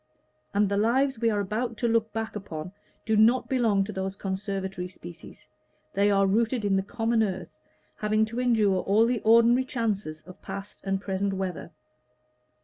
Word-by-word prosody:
And 205 +1 +2
the 200 +1 -1
lives 250 +4 +2
we 230 0 +2
are 210 -2 0
about 225 +4 -3
to 240 - 0
look 225 -1 +1
back 225 0 -4
upon 170 -4 -6 0.3
do 220 - +1
not 230 +4 +4
belong 225 -7 +2
to 205 - -6
those 190 0 -3
conservatory 190 -2 -4
species; 175 -2 -12 0.5
they 200 +1 +3
are 195 -1 +3
rooted 225 +3 +1
in 200 -1 +2
the 195 - +2
common 225 +3 0
earth, 185 -5 -2 0.5
having 215 +1 +2
to 230 +3 -5
endure 220 -6 +3
all 210 +3 +3
the 240 0 0
ordinary 235 +3 +5
chances 210 -11 -3
of 185 - -14
past 195 +1 -7
and 195 0 0
present 195 0 -2
weather. 190 -3 -4
210 Hz, 170 wpm, -27 LUFS, 195-230 Hz, 0.5 s, ordinary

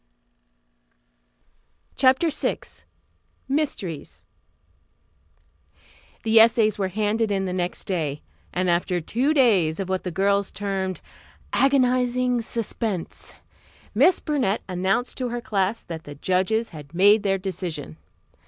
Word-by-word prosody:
CHAPTER 265 +5 +3
VI 295 - 0 0.9
MYSTERIES 265 - -3 2.0
The 225 0 +5
essays 225 -2 +4
were 195 - +1
handed 215 +3 0
in 195 -1 0
the 180 - -3
next 180 -1 -2
day, 155 -6 -3 0.3
and 185 +1 -1
after 175 +1 +1
two 245 - 0
days 195 - +3
of 190 -1 -3
what 190 -1 -1
the 180 - -3
girls 200 +2 +1
termed 195 -2 -3 0.5
"agonizing 250 -2 +2
suspense," 220 -4 -4 0.6
Miss 365 - +4
Burnett 265 -10 -1
announced 190 +6 -1
to 250 -1 -1
her 240 +1 -3
class 205 -2 -1
that 165 -1 -8
the 145 - -9
judges 190 +8 0
had 150 -1 -11
made 205 +4 +6
their 195 -2 +1
decision. 175 - -5
200 Hz, 115 wpm, -24 LUFS, 180-235 Hz, 2.0 s, made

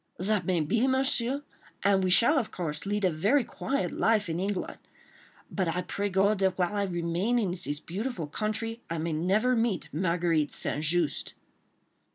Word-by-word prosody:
"That 190 0 +1
may 180 -3 +2
be, 230 - +1
Monsieur, 265 0 +1 0.4
and 195 -1 +3
we 185 - +1
shall, 240 +11 +5
of 230 - -3
course, 160 0 -5
lead 205 0 0
a 185 - +3
very 210 - +2
quiet 275 +4 -2
life 215 -4 +1
in 165 +1 -2
England, 195 0 -3 0.7
but 185 -3 -1
I 180 +2 -1
pray 205 0 -2
God 195 +2 +2
that 190 -2 +1
while 180 +2 0
I 200 -1 +1
remain 175 +6 0
in 205 -6 0
this 150 -5 -1
beautiful 195 +2 -4
country, 220 +7 -3
I 170 - -2
may 160 +1 -2
never 195 +10 +2
meet 225 -6 0
Marguerite 170 -3 +1
St. 150 - -2
Just." 165 0 0
190 Hz, 175 wpm, -28 LUFS, 170-220 Hz, 0.7 s, shall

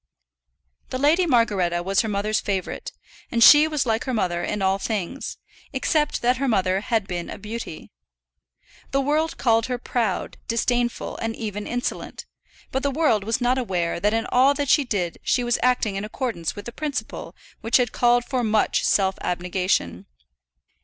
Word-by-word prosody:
The 255 - -3
Lady 315 +7 +3
Margaretta 195 - +2
was 195 +2 +2
her 220 - -3
mother's 210 +1 0
favourite, 195 -2 -3 0.4
and 230 -2 +3
she 300 +5 +9
was 300 -4 -1
like 225 -1 0
her 260 -2 -1
mother 175 -5 -1
in 205 +2 -2
all 190 +1 +2
things, 215 +4 -4 0.4
except 295 +2 0
that 245 +1 +3
her 275 +2 -1
mother 190 -4 +1
had 220 -1 0
been 175 -2 -4
a - - -6
beauty. 210 -5 -7 1.0
The 275 - +1
world 305 +4 0
called 230 -2 +2
her 250 -1 -2
proud, 235 -5 -2
disdainful, 240 +1 -1
and 225 0 -3
even 210 -2 -5
insolent; 245 0 -4 0.5
but 265 - -1
the 280 - 0
world 270 -8 +2
was 225 +4 -1
not 250 +2 +2
aware 180 -8 -1
that 210 +3 +2
in 225 0 0
all 265 +3 +5
that 285 -2 -2
she 295 - +5
did 195 -9 -2
she 245 - +1
was 240 -1 +1
acting 245 -5 +1
in 195 - -3
accordance 215 - -3
with 205 - -8
a - - -5
principle 290 +2 -5 0.3
which 225 - +3
had 245 -3 0
called 240 0 +3
for 255 -3 -1
much 215 -1 +1
self 190 -1 +2
abnegation. 180 - -1
230 Hz, 175 wpm, -23 LUFS, 195-255 Hz, 1.0 s, she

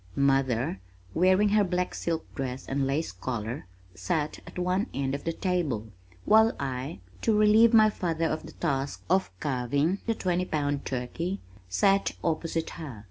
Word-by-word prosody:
Mother, 130 -7 +1 0.3
wearing 185 +4 +4
her 210 0 +4
black 180 -1 -1
silk 165 -1 -2
dress 130 -2 -4
and 135 0 0
lace 145 +4 -1
collar, 115 +4 -4 0.3
sat 145 - -2
at - - -10
one 180 +5 0
end 135 -1 -1
of 140 - -4
the 165 - +1
table, 160 - -1 0.4
while 220 +1 +5
I, 130 -7 -4 0.2
to 220 -2 +2
relieve 215 +2 +6
my 215 -2 +6
father 165 -4 -1
of 160 -1 -2
the 160 - -11
task 140 -4 -2
of 190 +1 +3
carving 140 +7 0
the 230 - +1
twenty 180 -2 0
pound 145 -4 -1
turkey, 150 +10 -3 0.3
sat 195 - +3
opposite 165 0 -1
her. 135 -9 -7
160 Hz, 155 wpm, -28 LUFS, 135-185 Hz, 0.4 s, relieve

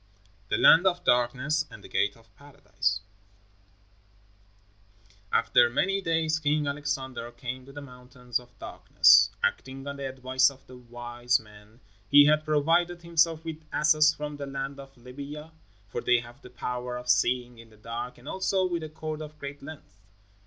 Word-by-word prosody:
THE - - +1
LAND 175 +4 +7
OF 180 -1 0
DARKNESS 130 +5 +1
AND 100 - -13
THE - - -10
GATE 105 - 0
OF 115 -3 -24
PARADISE 100 -8 -3 2.3
After 120 -1 +4
many 195 +11 0
days 160 -2 0
King 150 0 0
Alexander 140 -4 -4
came 125 +2 -7
to - - -11
the 145 +1 -9
Mountains 125 -2 -6
of 125 0 -19
Darkness. 100 +5 +4
Acting 135 +1 -2
on 140 0 -6
the 135 -1 -4
advice 130 0 +2
of 135 -1 -16
the 130 - -13
wise 120 0 -2
men, 105 +2 -18 0.3
he 145 0 +8
had 155 +1 +3
provided 170 +3 +1
himself 165 -1 +1
with 160 -1 -6
asses 150 0 +4
from 150 -1 -6
the 140 -1 -6
land 135 0 -5
of 135 -1 -13
Libya, 140 +5 -9 0.4
for 100 - -5
they 125 0 +3
have 120 +2 -9
the 125 - -13
power 125 0 -5
of 125 0 -9
seeing 125 -1 +1
in 115 -1 -14
the 110 - -20
dark, 115 +3 -6
and 125 +3 -16
also 190 +1 0
with 175 -2 -2
a 155 - -6
cord 155 0 -6
of 150 0 -9
great 140 -1 -8
length. 140 -9 -12
135 Hz, 165 wpm, -27 LUFS, 120-150 Hz, 2.3 s, he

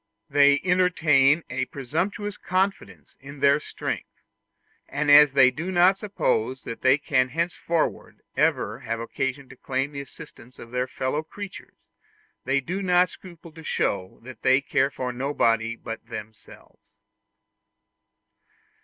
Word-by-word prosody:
They 145 0 +5
entertain 170 -5 +3
a 130 +1 -2
presumptuous 185 +11 -3
confidence 190 +2 -3
in 140 +1 -11
their 140 +1 +4
strength, - - -5 0.8
and 145 +1 0
as 145 -1 +8
they 130 -2 +6
do 160 +8 -5
not 180 +2 +5
suppose 130 - -1
that 115 - -7
they 130 +2 +5
can 130 -3 +1
henceforward 165 +2 -2
ever - - +1
have 115 0 -4
occasion 135 +3 -3
to - - -12
claim 135 +1 -2
the 140 -1 -5
assistance 125 -2 -14
of 115 - -12
their 125 +1 -1
fellow 130 +3 -2
creatures, 195 +5 -10 0.7
they 135 +1 +2
do 180 +8 -4
not 180 -1 +3
scruple 170 -2 -13
to 160 +1 -13
show 95 -10 -2
that 130 +1 -11
they 130 +1 +4
care 140 0 +1
for 125 -3 -4
nobody 115 -4 0
but 115 -1 -8
themselves. 110 +1 -11
140 Hz, 135 wpm, -25 LUFS, 130-170 Hz, 0.8 s, as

